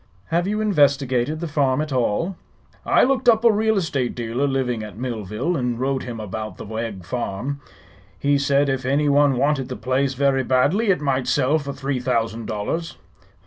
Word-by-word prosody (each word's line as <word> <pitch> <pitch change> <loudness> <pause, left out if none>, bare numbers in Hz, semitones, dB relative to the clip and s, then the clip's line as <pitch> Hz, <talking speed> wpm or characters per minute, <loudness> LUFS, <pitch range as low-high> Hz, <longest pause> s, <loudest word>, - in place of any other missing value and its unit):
"Have 170 +2 +1
you 210 +1 -1
investigated 140 - +2
the 170 - -2
farm 140 -3 +1
at 155 -2 -2
all?" 130 - 0 0.5
"I - - +5
looked 260 -1 +3
up 225 0 +4
a 230 - +8
real 220 0 +1
estate 140 -9 -1
dealer 120 +4 -1
living 130 -4 -1
at 105 -2 -8
Millville, 120 - -3
and 125 -4 -1
wrote 135 0 0
him 120 -2 -6
about 110 -1 -6
the - - -8
Wegg 110 -4 -5
farm. 125 +6 -4 0.6
He 140 +5 +2
said 140 0 +2
if 135 -1 -1
any 140 +3 +1
one 140 -2 +4
wanted 135 -1 +1
the 125 - -4
place 130 +4 0
very 135 0 +2
badly 145 - +2
it 180 -6 +2
might 135 -3 0
sell 145 +5 +2
for 140 -1 -5
three 135 -1 -3
thousand 115 -2 -1
dollars." 110 +11 -3
135 Hz, 185 wpm, -22 LUFS, 120-150 Hz, 0.6 s, a